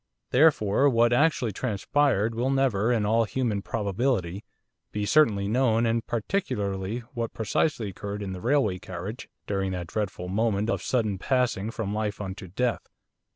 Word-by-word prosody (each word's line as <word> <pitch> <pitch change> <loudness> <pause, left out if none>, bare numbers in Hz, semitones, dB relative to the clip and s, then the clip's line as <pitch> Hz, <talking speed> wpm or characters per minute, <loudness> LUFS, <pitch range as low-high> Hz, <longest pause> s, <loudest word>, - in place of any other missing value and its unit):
Therefore 135 -3 +4
what 120 -1 +3
actually 130 -4 +2
transpired 115 +1 +1
will 120 +3 0
never, 125 -5 +2
in 110 -4 +1
all 115 +2 +3
human 110 -2 -1
probability, 100 -2 -1 0.5
be 105 0 -2
certainly 105 -6 +3
known 115 0 +2
and 115 0 +1
particularly 105 - -2
what 115 -2 -4
precisely 110 +1 0
occurred 100 +2 -5
in 95 -1 -4
the 90 - -7
railway 120 -7 +2
carriage 95 +3 -7 0.2
during 95 -2 -1
that 90 -1 -4
dreadful 95 -1 -3
moment 105 +2 0
of - - -1
sudden 110 -6 0
passing 125 -4 0
from 110 -3 -3
life 105 -1 -2
unto 95 -1 -6
death. 120 +7 -1
110 Hz, 150 wpm, -26 LUFS, 100-125 Hz, 0.5 s, Therefore